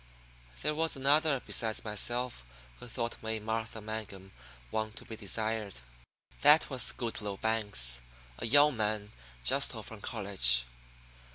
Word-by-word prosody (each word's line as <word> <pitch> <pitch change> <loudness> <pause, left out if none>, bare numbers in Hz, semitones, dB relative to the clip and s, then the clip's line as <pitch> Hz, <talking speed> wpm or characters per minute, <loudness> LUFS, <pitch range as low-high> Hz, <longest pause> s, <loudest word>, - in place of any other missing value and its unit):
There 150 - +1
was 160 +1 +1
another 140 +1 +4
besides 110 -2 0
myself 120 - -1 0.4
who 125 - -9
thought 115 0 -4
May 110 0 -3
Martha 110 +1 -3
Mangum 105 -3 -6 0.4
one 110 0 -1
to - - -11
be 110 - -7
desired. 110 - -3 0.6
That 150 +1 +6
was 130 -4 +2
Goodloe 105 -4 -4
Banks, 100 - +1 0.4
a - - -2
young 145 +3 +6
man 105 -1 -1 0.3
just - - +3
home - - -7
from - - -9
college. - - +2
110 Hz, 130 wpm, -31 LUFS, 105-125 Hz, 0.6 s, That